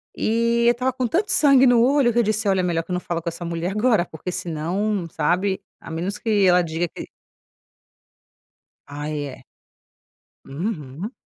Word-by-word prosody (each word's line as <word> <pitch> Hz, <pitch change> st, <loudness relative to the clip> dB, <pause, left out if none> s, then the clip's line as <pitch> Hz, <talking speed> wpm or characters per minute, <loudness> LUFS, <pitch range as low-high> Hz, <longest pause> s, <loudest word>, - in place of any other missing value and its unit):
E 235 Hz, +1 st, +1 dB
eu -, -, +7 dB
estava 250 Hz, +2 st, -1 dB
com 255 Hz, -1 st, -2 dB
tanto 375 Hz, -, 0 dB
sangue 275 Hz, -3 st, +5 dB
no 245 Hz, -2 st, +5 dB
olho 270 Hz, -1 st, +3 dB
que 235 Hz, -, +1 dB
eu -, -, +4 dB
disse: 215 Hz, 0 st, -1 dB
"Olha 190 Hz, -1 st, +2 dB
é -, -, -3 dB
melhor 170 Hz, -2 st, 0 dB
que 165 Hz, -, -10 dB
eu -, -, 0 dB
não 180 Hz, -, 0 dB
falo 170 Hz, -1 st, -4 dB
com 170 Hz, -, -3 dB
essa 170 Hz, +1 st, -7 dB
mulher 170 Hz, +2 st, -3 dB
agora". 215 Hz, -3 st, +2 dB
Porque 165 Hz, +2 st, -7 dB
senão, 175 Hz, +4 st, -2 dB
sabe, 185 Hz, +6 st, 0 dB, 0.2 s
a -, -, -10 dB
menos 180 Hz, +5 st, -3 dB
que 210 Hz, -4 st, +1 dB
ela 180 Hz, -1 st, +5 dB
diga 165 Hz, +1 st, -2 dB
que -, -, -9 dB, 1.8 s
Ai, 145 Hz, +1 st, -4 dB
é. 140 Hz, -, -10 dB, 1.0 s
Uhum. 155 Hz, -, -5 dB
190 Hz, 180 wpm, -22 LUFS, 165-230 Hz, 1.8 s, eu